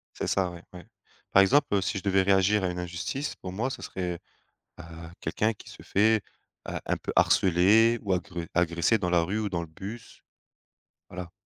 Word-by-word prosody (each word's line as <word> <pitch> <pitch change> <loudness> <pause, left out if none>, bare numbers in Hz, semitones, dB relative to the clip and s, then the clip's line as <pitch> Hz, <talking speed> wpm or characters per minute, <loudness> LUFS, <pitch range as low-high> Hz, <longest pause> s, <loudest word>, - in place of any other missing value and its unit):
C'est - - -3
ça. 95 -2 +1
Ouais, 85 0 -11
ouais, 90 - -10 0.5
par 100 - +7
exemple, 140 +9 +4
heu, 100 - +3
si 95 +2 -2
je - - -8
devais 95 -1 +2
réagir 95 +1 +3
à - - +1
une 90 - -5
injustice 90 - -4
pour 90 - -8
moi 120 +7 -2
ce - - -6
serait 90 -2 -4 0.6
à 80 0 -10
quelqu'un 110 +2 0
qui - - -15
se - - -12
fait, 110 +1 +2 0.5
heu, - - -3
un - - 0
peu - - -5
harcelé 105 +6 +4
ou 100 -2 -1
agre 90 -1 -3
agressé 85 +5 +2
dans 90 -2 -2
la 85 -1 +3
rue 100 +6 -2
ou 105 - -1
dans 85 -3 -2
le 85 - -5
bus. 100 +8 -10 0.9
Voilà 90 -1 -7
95 Hz, 200 wpm, -27 LUFS, 90-105 Hz, 0.9 s, par